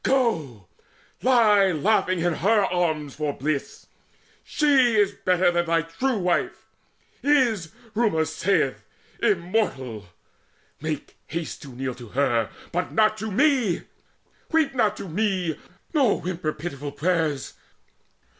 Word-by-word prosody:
Go, 160 - 0 0.6
Lie 210 -7 +4
laughing 185 +1 +1
in 175 0 +1
her 205 +5 +3
arms 160 -6 -1
for 150 -1 -2
bliss! 140 +1 -3 0.6
She 270 -6 +3
is 205 -2 +3
better 180 -2 +2
Than 175 0 0
thy 165 0 +2
true 240 +10 -1
wife 180 -3 -1 0.6
is, 240 - +2 0.2
rumour 210 -8 +2
saith, 160 -3 0 0.4
immortal! 130 - -1 0.7
Make 155 -2 -5
haste 165 -1 -5
to - - -10
kneel 130 0 -3
to 120 -1 -11
her 120 -2 +1 0.2
but 180 +1 -2
not 215 -1 +3
to 220 +1 -3
me! 250 - +2 0.7
Weep 315 -4 +2
not 215 -5 +1
to - - -6
me, 180 -3 -1 0.3
nor 270 -9 +3
whimper 175 -3 -3
pitiful 145 -3 -6
prayers! 160 -4 -1
180 Hz, 120 wpm, -24 LUFS, 155-220 Hz, 0.7 s, Lie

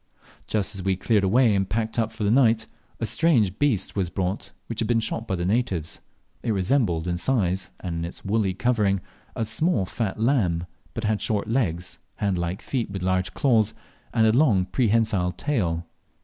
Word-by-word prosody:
Just 105 -2 -1
as 95 - -3
we 95 +1 +1
had 95 - -5
cleared 105 -2 +2
away 115 +4 +4
and 95 -1 0
packed 110 +1 -1
up 110 -1 0
for 110 -1 -5
the 100 - +2
night, 115 -3 +4 0.3
a 115 - -1
strange 115 - +2
beast 130 -10 +1
was 95 -4 0
brought, 95 +2 -3
which 115 - -5
had 115 - +1
been 120 -1 +3
shot 115 +1 -2
by 95 - 0
the 85 -1 -2
natives. 95 -6 -1 0.4
It 115 - 0
resembled 95 - +1
in 85 0 0
size, 95 -3 0
and 85 -3 -3
in 85 - -2
its 85 - -8
white 100 - -3
woolly 105 -4 +2
covering, 105 -4 +1 0.3
a 115 - -1
small 110 - +1
fat 110 0 -3
lamb, 105 -9 +1 0.3
but 115 - -3
had 110 -1 0
short 105 -2 0
legs, 90 -8 -1 0.2
hand 100 -4 0
like 85 +2 -3
feet 125 -6 -2
with 95 -2 -5
large 95 0 0
claws, 115 -6 +3 0.4
and 115 -2 +3
a 110 - +5
long 115 -9 +4
prehensile 105 -3 +1
tail. 85 - -1
105 Hz, 195 wpm, -25 LUFS, 95-115 Hz, 0.4 s, a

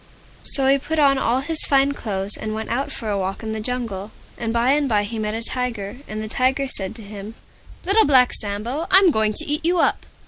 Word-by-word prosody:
So 270 - +1
he 275 +1 +4
put 320 +4 -3
on 275 -3 +4
all 250 +1 +1
his 315 +2 -1
Fine 275 0 +3
Clothes, 205 -6 0
and 215 0 -4
went 220 +1 -5
out 270 +4 -1
for 225 - -5
a 205 -2 -1
walk 190 +3 -4
in 220 - -4
the 220 - -3
Jungle. 215 -4 -4 0.3
And 230 -1 -3
by 235 +3 +2
and 290 -1 +1
by 210 -2 +2
he 220 +2 -5
met 215 0 -2
a 230 - -4
Tiger. 240 -4 -3
And 215 0 -5
the - - -5
Tiger 260 +4 0
said 195 -4 0
to 225 - -8
him, 205 +1 -9 0.5
"Little 410 +4 +4
Black 260 -3 +4
Sambo, 225 +10 -2
I'm 380 -2 +6
going 220 -4 +2
to - - -2
eat 300 +1 -2
you 350 +2 +2
up!" - - +1
235 Hz, 235 wpm, -21 LUFS, 215-275 Hz, 0.5 s, I'm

